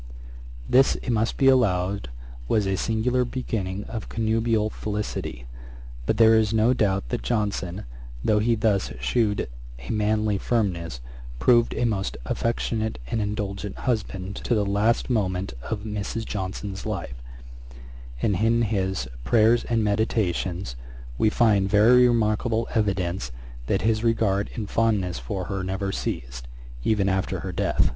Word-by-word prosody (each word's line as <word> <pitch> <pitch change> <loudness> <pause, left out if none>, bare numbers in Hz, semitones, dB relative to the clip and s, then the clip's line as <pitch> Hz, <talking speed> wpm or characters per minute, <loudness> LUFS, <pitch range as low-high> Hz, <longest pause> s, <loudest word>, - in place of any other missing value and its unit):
This, 135 +2 +5
it 125 - -3
must 115 0 0
be 135 - +4
allowed, 100 - +2 0.4
was 105 - +2
a 95 0 +1
singular 115 +5 +1
beginning 105 -6 -3
of 110 0 -6
connubial 110 -1 +1
felicity; 105 - -4 0.6
but - - +1
there 115 -1 +7
is 110 -2 +3
no 110 +3 +4
doubt 95 - 0
that - - -2
Johnson, 95 - -2 0.4
though 105 -1 +4
he 115 +2 +2
thus 105 - +1
shewed 100 - +1 0.3
a 65 0 -7
manly 105 -1 +1
firmness, 90 - -1 0.4
proved 120 - +4
a 120 - +1
most 100 -4 -1
affectionate 110 - -1
and 110 - 0
indulgent 105 -1 -3
husband 100 -5 -2
to 120 - 0
the 105 -2 +1
last 105 +4 +1
moment 95 - 0
of 105 - -4
Mrs. 105 +1 -3
Johnson's 95 0 -4
life: 85 - -5 1.0
and 100 -4 +2
in 115 +3 +2
his 95 - -1 0.2
Prayers 115 - +4
and 115 -2 +1
Meditations, 100 - 0 0.4
we 110 - +4
find 105 -4 +3
very 120 +5 +6
remarkable 115 0 +1
evidence 95 - 0 0.4
that 95 - 0
his 110 0 +1
regard 110 -4 +1
and 110 -3 -4
fondness 100 - +1
for 90 +10 -4
her 95 -1 -3
never 95 +1 -2
ceased, - - -4 0.4
even 105 - +2
after 95 -1 -1
her - - -4
death. - - +1
105 Hz, 140 wpm, -25 LUFS, 95-115 Hz, 1.0 s, there